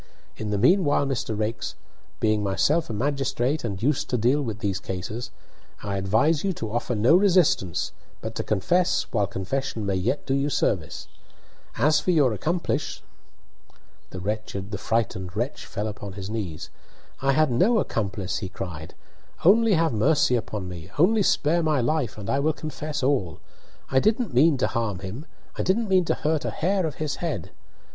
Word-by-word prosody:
In 110 Hz, -, -5 dB
the 105 Hz, -, 0 dB
meanwhile, 145 Hz, -, +4 dB
Mr. 130 Hz, -5 st, -2 dB
Raikes, 110 Hz, +2 st, -3 dB, 0.4 s
being 110 Hz, -1 st, +2 dB
myself 140 Hz, +11 st, +1 dB
a -, -, -3 dB
magistrate 135 Hz, +3 st, 0 dB
and 100 Hz, -3 st, -4 dB
used 145 Hz, +1 st, +1 dB
to 125 Hz, -, +1 dB
deal 125 Hz, +6 st, +2 dB
with 115 Hz, -6 st, -3 dB
these 100 Hz, -3 st, -2 dB
cases, 105 Hz, +6 st, -5 dB, 0.5 s
I 100 Hz, -1 st, -2 dB
advise 110 Hz, +12 st, +2 dB
you 195 Hz, -1 st, 0 dB
to 110 Hz, -9 st, -5 dB
offer 120 Hz, +1 st, -1 dB
no 115 Hz, +10 st, +5 dB
resistance 180 Hz, -, +3 dB, 0.3 s
but -, -, -5 dB
to -, -, -3 dB
confess 175 Hz, -, +2 dB
while 105 Hz, -4 st, +1 dB
confession 110 Hz, +4 st, -3 dB
may 100 Hz, -, 0 dB
yet 100 Hz, +10 st, -1 dB
do 135 Hz, -, 0 dB
you 140 Hz, +1 st, +1 dB
service. 90 Hz, -, -1 dB, 0.7 s
As 150 Hz, +1 st, +4 dB
for 150 Hz, -, -3 dB
your 145 Hz, -9 st, +4 dB
accomplice 165 Hz, -, -2 dB, 0.6 s
" -, -, -33 dB
The 100 Hz, +1 st, -4 dB
frightened 105 Hz, -5 st, -1 dB
wretch 120 Hz, +6 st, -3 dB
fell 105 Hz, -, -3 dB
upon 105 Hz, -2 st, -6 dB
his 100 Hz, +1 st, -6 dB
knees. 95 Hz, -9 st, -5 dB, 0.5 s
"I 135 Hz, 0 st, +3 dB
had 155 Hz, -1 st, +3 dB
no 195 Hz, -, +3 dB
accomplice!" 100 Hz, -, -2 dB
he 95 Hz, -, -5 dB
cried, 85 Hz, -5 st, -7 dB, 0.5 s
"Only 220 Hz, +4 st, +6 dB
have 165 Hz, -3 st, +2 dB
mercy 125 Hz, +3 st, +3 dB
upon 105 Hz, -5 st, -3 dB
me 90 Hz, -1 st, -8 dB
only 210 Hz, +7 st, +4 dB
spare 170 Hz, -2 st, +2 dB
my 155 Hz, -3 st, +2 dB
life, 125 Hz, -2 st, 0 dB
and 100 Hz, -2 st, -7 dB
I 135 Hz, -, +1 dB
will 155 Hz, +3 st, +2 dB
confess 150 Hz, -2 st, -5 dB
all! 125 Hz, -, 0 dB, 0.5 s
I 130 Hz, -, +5 dB
didn't 220 Hz, -, +1 dB
mean 145 Hz, +4 st, +5 dB
to 130 Hz, -, +1 dB
harm 115 Hz, -6 st, -2 dB
him! 110 Hz, -, -7 dB, 0.3 s
I -, -, 0 dB
didn't 210 Hz, +3 st, +1 dB
mean 185 Hz, -2 st, +4 dB
to -, -, +1 dB
hurt 155 Hz, 0 st, 0 dB
a -, -, -1 dB
hair 185 Hz, 0 st, 0 dB
of 150 Hz, -, -6 dB
his 155 Hz, -2 st, -3 dB
head! 155 Hz, -, -4 dB
125 Hz, 175 wpm, -25 LUFS, 105-155 Hz, 0.7 s, Only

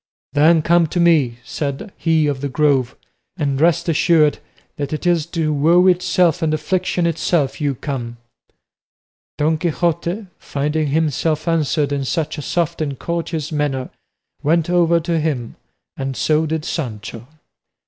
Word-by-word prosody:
"Then 155 Hz, +2 st, +4 dB
come 170 Hz, 0 st, +3 dB
to 175 Hz, -, -2 dB
me," 155 Hz, -9 st, +3 dB
said 140 Hz, +7 st, -4 dB
he 160 Hz, -2 st, +2 dB
of 140 Hz, -3 st, -1 dB
the 140 Hz, -, -2 dB
Grove, 135 Hz, -3 st, +1 dB, 0.4 s
"and 140 Hz, -4 st, -1 dB
rest 170 Hz, +1 st, +3 dB
assured 155 Hz, -2 st, +3 dB, 0.4 s
that 145 Hz, 0 st, -3 dB
it 155 Hz, -, -4 dB
is 170 Hz, -3 st, +2 dB
to 160 Hz, -3 st, -1 dB
woe 165 Hz, +5 st, +4 dB
itself 180 Hz, -1 st, +3 dB
and 160 Hz, -1 st, +1 dB
affliction 175 Hz, +3 st, -1 dB
itself 165 Hz, -3 st, 0 dB
you 140 Hz, -2 st, 0 dB
come." 120 Hz, -3 st, -5 dB, 1.2 s
Don 155 Hz, +1 st, +1 dB
Quixote, 170 Hz, +4 st, -1 dB
finding 150 Hz, +2 st, -1 dB
himself 155 Hz, +1 st, 0 dB
answered 155 Hz, -3 st, +1 dB
in 140 Hz, -1 st, -1 dB
such 155 Hz, +2 st, -2 dB
a -, -, -4 dB
soft 170 Hz, +1 st, -1 dB
and 140 Hz, -3 st, -2 dB
courteous 165 Hz, 0 st, -3 dB
manner, 145 Hz, -4 st, -2 dB, 0.5 s
went 165 Hz, +3 st, +1 dB
over 170 Hz, -1 st, +3 dB
to 165 Hz, 0 st, -1 dB
him, 140 Hz, -7 st, -2 dB, 0.4 s
and 135 Hz, -1 st, -4 dB
so 155 Hz, +1 st, +2 dB
did 160 Hz, 0 st, -2 dB
Sancho. 115 Hz, -5 st, -5 dB
155 Hz, 145 wpm, -19 LUFS, 145-170 Hz, 1.2 s, Then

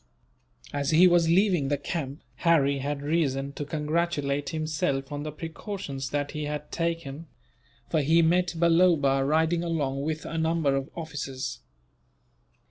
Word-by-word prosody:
As 140 Hz, -1 st, -1 dB
he 170 Hz, +3 st, +7 dB
was 175 Hz, -2 st, +4 dB
leaving 180 Hz, -5 st, +3 dB
the 145 Hz, +1 st, +1 dB
camp, 140 Hz, 0 st, -5 dB
Harry 140 Hz, -3 st, +3 dB
had 140 Hz, +1 st, -3 dB
reason 140 Hz, -3 st, 0 dB
to 145 Hz, -, -4 dB
congratulate 150 Hz, -1 st, -1 dB
himself 155 Hz, -3 st, -2 dB
on 145 Hz, 0 st, -4 dB
the 155 Hz, +1 st, -4 dB
precautions 160 Hz, -, -6 dB
that 145 Hz, +1 st, -2 dB
he 150 Hz, 0 st, -4 dB
had 150 Hz, 0 st, -5 dB
taken; 165 Hz, -2 st, -3 dB, 0.6 s
for 155 Hz, -, +1 dB
he 165 Hz, +4 st, +4 dB
met 175 Hz, +2 st, +2 dB
Balloba, 165 Hz, -5 st, +4 dB
riding 160 Hz, +4 st, +2 dB
along 145 Hz, -5 st, -1 dB
with 155 Hz, +2 st, -3 dB
a 165 Hz, -, -3 dB
number 160 Hz, -3 st, +1 dB
of 135 Hz, 0 st, -2 dB
officers. 140 Hz, -6 st, -5 dB
155 Hz, 140 wpm, -27 LUFS, 140-165 Hz, 0.6 s, he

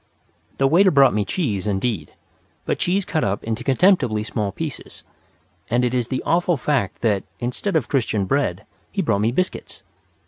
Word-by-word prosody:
The 135 Hz, -, +2 dB
waiter 175 Hz, +8 st, +5 dB
brought 140 Hz, -5 st, +5 dB
me 105 Hz, 0 st, +1 dB
cheese, 105 Hz, -, -2 dB
indeed, 100 Hz, -5 st, -2 dB, 0.5 s
but -, -, -1 dB
cheese 185 Hz, +2 st, +1 dB
cut 155 Hz, -, -1 dB
up 100 Hz, 0 st, -1 dB
into 115 Hz, +2 st, -3 dB
contemptibly 135 Hz, -, +3 dB
small 105 Hz, -2 st, -2 dB
pieces; 150 Hz, +6 st, -7 dB, 0.7 s
and 120 Hz, +2 st, +2 dB
it 125 Hz, -, -1 dB
is 125 Hz, -2 st, 0 dB
the 130 Hz, 0 st, -3 dB
awful 175 Hz, -1 st, +2 dB
fact 125 Hz, -7 st, -1 dB
that, 105 Hz, -4 st, +2 dB, 0.2 s
instead 125 Hz, +11 st, -2 dB
of 150 Hz, -7 st, +1 dB
Christian 110 Hz, -7 st, 0 dB
bread, 105 Hz, -5 st, -1 dB, 0.3 s
he 195 Hz, -1 st, -1 dB
brought 110 Hz, -9 st, +1 dB
me 110 Hz, +2 st, +2 dB
biscuits. 185 Hz, +9 st, -3 dB
125 Hz, 170 wpm, -22 LUFS, 105-155 Hz, 0.7 s, waiter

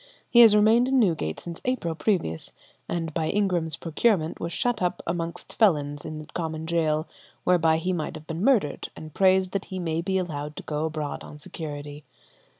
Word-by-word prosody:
He 240 Hz, -, +6 dB
has 225 Hz, -3 st, +9 dB
remained 220 Hz, +4 st, +5 dB
in 265 Hz, 0 st, +3 dB
Newgate 165 Hz, -, +1 dB
since 170 Hz, -1 st, -7 dB
April 250 Hz, -10 st, -1 dB
previous, 160 Hz, -, -1 dB, 0.4 s
and 165 Hz, -2 st, -2 dB
by 155 Hz, -, -1 dB
Ingram's 180 Hz, -6 st, +1 dB
procurement 165 Hz, 0 st, 0 dB
was 170 Hz, -, -3 dB
shut 245 Hz, +2 st, 0 dB
up 180 Hz, 0 st, -1 dB
amongst 170 Hz, 0 st, -4 dB
felons 145 Hz, -9 st, +2 dB
in 155 Hz, -1 st, -5 dB
the 155 Hz, -, -8 dB
common 160 Hz, -2 st, -3 dB
gaol, 160 Hz, -2 st, +1 dB, 0.4 s
whereby 165 Hz, -3 st, +4 dB
he 180 Hz, +3 st, -1 dB
might 160 Hz, -3 st, -3 dB
have 155 Hz, -, -10 dB
been 165 Hz, +3 st, -4 dB
murdered, 220 Hz, -, +2 dB
and 155 Hz, -1 st, -10 dB
prays 190 Hz, -1 st, +4 dB
that 195 Hz, -1 st, -2 dB
he 190 Hz, -, -6 dB
may 165 Hz, -2 st, -1 dB
be 190 Hz, +2 st, 0 dB
allowed 150 Hz, -5 st, -3 dB
to -, -, -7 dB
go 150 Hz, +1 st, -2 dB
abroad 155 Hz, -2 st, -4 dB
on 150 Hz, -, -10 dB
security. 145 Hz, -1 st, -7 dB
165 Hz, 185 wpm, -26 LUFS, 155-190 Hz, 0.4 s, has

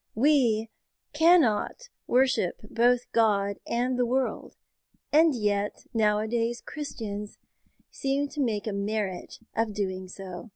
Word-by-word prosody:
We 230 Hz, -4 st, +3 dB, 0.4 s
cannot 325 Hz, -, +3 dB, 0.2 s
worship 255 Hz, -8 st, +2 dB
both 240 Hz, +1 st, +3 dB
God 200 Hz, -3 st, +2 dB
and 250 Hz, +2 st, 0 dB
the 245 Hz, -, +3 dB
world, 260 Hz, +1 st, -2 dB, 0.6 s
and 315 Hz, -1 st, +5 dB
yet 205 Hz, -2 st, -1 dB
nowadays 225 Hz, +2 st, +1 dB
Christians 210 Hz, -8 st, -6 dB, 0.5 s
seem 275 Hz, +1 st, -1 dB
to 300 Hz, 0 st, -4 dB
make 215 Hz, -5 st, -1 dB
a 215 Hz, -, -2 dB
merit 200 Hz, -2 st, -3 dB, 0.2 s
of 220 Hz, -2 st, -1 dB
doing 185 Hz, -2 st, -3 dB
so. 185 Hz, +3 st, -9 dB
225 Hz, 115 wpm, -27 LUFS, 205-260 Hz, 0.6 s, and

